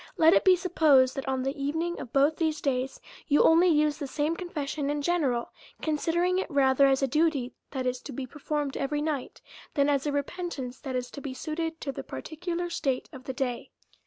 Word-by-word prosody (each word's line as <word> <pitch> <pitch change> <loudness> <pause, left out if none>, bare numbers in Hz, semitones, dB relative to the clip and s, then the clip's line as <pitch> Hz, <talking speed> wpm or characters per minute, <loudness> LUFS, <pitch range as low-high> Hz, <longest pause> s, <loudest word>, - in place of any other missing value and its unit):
Let 325 +1 +6
it - - +4
be 375 -2 +7
supposed, 310 -8 +4
that, 270 - -4
on 265 -1 0
the 270 +2 -2
evening 320 +5 -1
of 240 - -7
both 285 +3 +3
these 315 -2 0
days, 265 -1 -1 0.3
you 290 -1 +4
only 335 +3 +6
use 300 -3 +3
the 285 - -3
same 300 +4 -1
confession 300 -5 -3
in 290 0 -1
general, 280 -8 0 0.3
con 310 -1 0
sidering 350 +4 +1
it 380 - -3
rather 275 -2 +4
as 270 0 +2
a - - +3
duty, 295 -3 +1 0.2
that 260 -2 -3
is 250 0 -1
to 290 - -8
be 265 +1 -4
performed 295 +1 -3
every 295 +2 -1
night, 300 -4 -3 0.3
than 285 -1 +3
as 280 0 +1
a - - +1
repentance 285 -3 -4
that 265 -3 -5
is 250 -1 -3
to 280 - -8
be 270 -2 -5
suited 325 +3 -3
to 275 - -2
the - - -6
particular 350 +2 -4
state 270 -6 -1
of 260 -1 -10
the 260 - -4
day. 250 -2 -3
290 Hz, 215 wpm, -28 LUFS, 265-325 Hz, 0.3 s, be